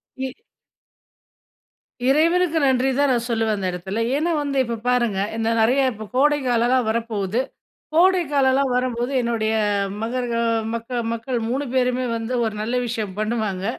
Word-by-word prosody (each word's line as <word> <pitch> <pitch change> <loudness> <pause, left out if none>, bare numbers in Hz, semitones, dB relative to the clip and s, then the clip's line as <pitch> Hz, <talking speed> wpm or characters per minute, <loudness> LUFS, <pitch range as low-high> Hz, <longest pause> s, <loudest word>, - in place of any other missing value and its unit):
இ 265 -1 -4 1.7
இறைவனுக்கு 330 +4 +3
நன்றி 260 0 +2
தான் 285 0 +3
நான் 240 -1 0
சொல்லுவேன் 225 -2 +1
அந்த 190 -2 -2
இடத்துல. 190 +5 -4 0.2
ஏன்னா 325 +4 0
வந்து, 280 -1 -2
இப்போ 235 -2 -3
பாருங்க 240 -5 +1 0.2
இந்த 225 0 0
நிறைய 245 +5 +3
இப்போ 215 -1 -8
கோடைக்காலம்லாம் 255 -4 +2
வரப்போது. 220 -2 -1 0.6
கோடைக்காலம்லாம் 285 -7 +3
வரம்போது 250 0 -1
என்னுடைய 230 -2 0 0.5
மகருக 240 +1 -2 0.4
மக்கள் 235 +1 -3
மக்கள் 235 +2 -3
3 275 +4 -1
பேருமே 250 0 +1
வந்து, 225 +2 -4
ஒரு 220 - -2
நல்ல 235 +3 -2
விஷயம் 215 -4 -3
பண்ணுவாங்க. 215 -4 -2
245 Hz, 130 wpm, -22 LUFS, 225-270 Hz, 1.7 s, இறைவனுக்கு